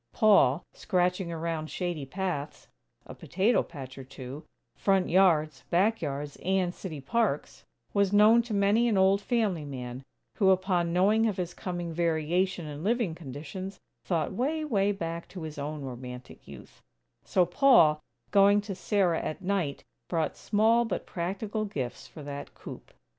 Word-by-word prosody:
Paul, 175 - +4
scratching 180 -2 0
around 165 -1 -3
shady 175 -6 -3
paths, 165 -4 -4 0.4
a - - -9
potato 200 +7 +1
patch 135 -4 -9
or - - -7
two, 130 +3 -9 0.3
front 195 -2 +1
yards, 160 -6 +3
back 205 +6 +2
yards, 145 +1 -4
and 185 -1 0
city 165 -7 -7
parks, 225 +13 -1 0.3
was 200 -2 +2
known 215 +3 +6
to 230 -1 -6
many 205 +4 +3
an 220 -4 +2
old 190 +1 +4
family 205 - 0
man; 130 -3 -6 0.4
who 195 -3 +4
upon 185 -2 +2
knowing 210 +6 +3
of 210 - -2
his 175 -1 -3
coming 175 -2 -5
variation 170 +2 0
in 150 +1 -7
living 225 -4 +1
conditions, 165 +6 -7 0.2
thought 165 -1 -1
way, 305 +9 -1
way 205 -7 +2
back 170 -3 -5
to 180 -4 -8
his 155 -2 -7
own 150 0 -4
romantic 125 -1 -9
youth; 70 -3 -13 0.4
so 180 - +2
Paul, 175 - +5 0.3
going 200 +1 +6
to 205 -1 -6
Sarah 185 -2 +1
at 155 - -5
night, 180 -7 -1 0.3
brought 165 -3 -1
small 225 +3 +3
but 225 -5 -3
practical 200 +5 -3
gifts 130 -12 -5
for 155 - -11
that 140 0 -7
"coop." - - -10
180 Hz, 155 wpm, -28 LUFS, 155-200 Hz, 0.4 s, known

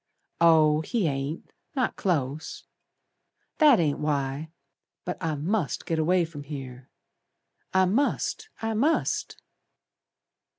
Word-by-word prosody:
"Oh, 155 -2 +5
he 220 +4 -1
ain't. 140 +2 -4 0.2
Not 255 -4 0
close. 155 -4 -2 1.0
That 295 -7 +7
ain't 150 -4 +1
why. 145 0 -1 0.6
But 180 - -5
I 160 -2 0
must 165 +3 -1
git 165 -1 -1
away 175 +2 +3
from 160 -3 -9
here. 135 -3 -8 0.8
I 190 0 +4
must! 285 - 0
I 225 0 0
must!" 285 +9 0
160 Hz, 110 wpm, -26 LUFS, 145-195 Hz, 1.0 s, That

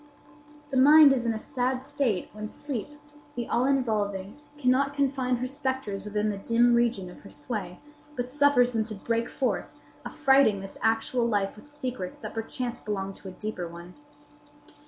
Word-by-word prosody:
The 265 - 0
mind 290 +2 +8
is 245 -3 -1
in - - +3
a 220 - -2
sad 255 +2 -2
state 225 -10 -1
when 215 0 -5
Sleep, 275 +1 -5 0.5
the 240 -1 -3
all 245 +3 +2
involving, 215 -3 -1 0.2
cannot 275 +1 +2
confine 265 -3 +1
her 245 +1 -3
spectres 260 -6 -3
within 210 +1 -1
the 200 - -5
dim 235 +3 +3
region 235 -5 +2
of - - -13
her - - -13
sway, 180 +3 -5 0.4
but 245 0 -2
suffers 280 -2 +4
them 225 -2 +1
to 215 -1 -6
break 230 +3 -1
forth, 260 - -2 0.3
affrighting 265 -7 +3
this 195 0 -9
actual 225 +2 +1
life 205 -3 0
with 215 +8 -15
secrets 255 -10 -5
that - - -7
perchance 240 +2 -4
belong 195 -2 -3
to 195 - -12
a - - -6
deeper 185 -2 -5
one. 170 +1 -11
235 Hz, 170 wpm, -27 LUFS, 210-260 Hz, 0.5 s, mind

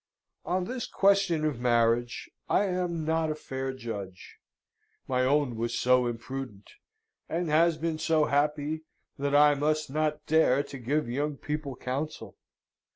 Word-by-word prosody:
On 180 +1 0
this 250 +2 -4
question 195 -5 +2
of 145 -6 -1
marriage, 120 0 +1 0.2
I - - +3
am 180 -4 -2
not 160 0 +1
a 155 - -1
fair 135 -3 -4
judge: 110 -7 -8 0.7
my 130 -1 +1
own 140 -2 +2
was 115 +1 -2
so 125 0 +3
imprudent 120 -3 -6 0.6
and 170 0 -1
has 165 +1 +4
been 160 0 -2
so 155 -2 +2
happy, 150 +2 0 0.4
that 140 0 0
I 145 0 +7
must 150 0 0
not 150 0 -1
dare 145 -3 +3
to 140 -1 -9
give 140 +4 -1
young 145 +4 -2
people 150 -2 -4
counsel. 135 +5 -5
145 Hz, 145 wpm, -28 LUFS, 125-155 Hz, 0.7 s, I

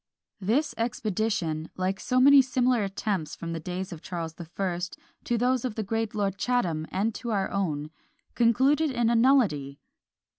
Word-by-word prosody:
This 230 +10 +1
expedition, 210 -8 -1
like 185 +1 -1
so 255 0 +1
many 280 +1 +8
similar 250 -3 +1
attempts 195 -4 -2
from 165 0 -5
the 165 - -3
days 180 +3 -5
of 160 - -10
Charles 165 -3 -5
the 170 +1 -9
First 175 0 -3 0.3
to 240 - 0
those 250 +1 +1
of 250 -4 -3
the 220 - -2
great 225 +1 -2
Lord 200 -2 -1
Chatham, 175 -11 0
and 215 +4 -1
to 240 - -6
our 200 -3 0
own 155 -6 -2 0.4
concluded 265 +7 +3
in 240 -3 +1
a - - +3
nullity! 205 - +3
205 Hz, 170 wpm, -27 LUFS, 175-245 Hz, 0.4 s, many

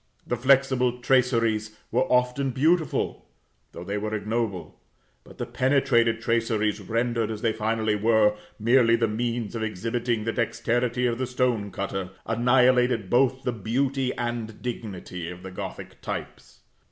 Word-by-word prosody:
The 120 - -1
flexible 130 -1 +3
traceries 115 -4 +1
were 175 - +1
often 125 +2 +2
beautiful, 155 +4 0 0.4
though - - -8
they 100 +3 -3
were 110 +1 -3
ignoble; 105 - -3 0.4
but - - -16
the 120 - -3
penetrated 120 -2 +2
traceries, 110 -2 0
rendered, 115 +2 -1
as 110 -1 -5
they 115 -1 +2
finally 110 0 0
were, 110 0 +3 0.2
merely 115 +1 +4
the 115 -1 +1
means 115 0 -2
of 115 - -4
exhibiting 115 +2 -2
the 115 +1 -2
dexterity 120 +1 0
of 120 0 0
the 130 - -1
stone 125 -5 0
cutter, 95 0 -4 0.2
annihilated 125 -2 +3
both 130 +1 +3
the 125 - -1
beauty 130 +5 -1
and 120 -2 -4
dignity 95 -7 -5
of 90 0 -9
the 95 - -7
Gothic 90 - -8
types. - - -7
115 Hz, 140 wpm, -25 LUFS, 110-125 Hz, 0.4 s, merely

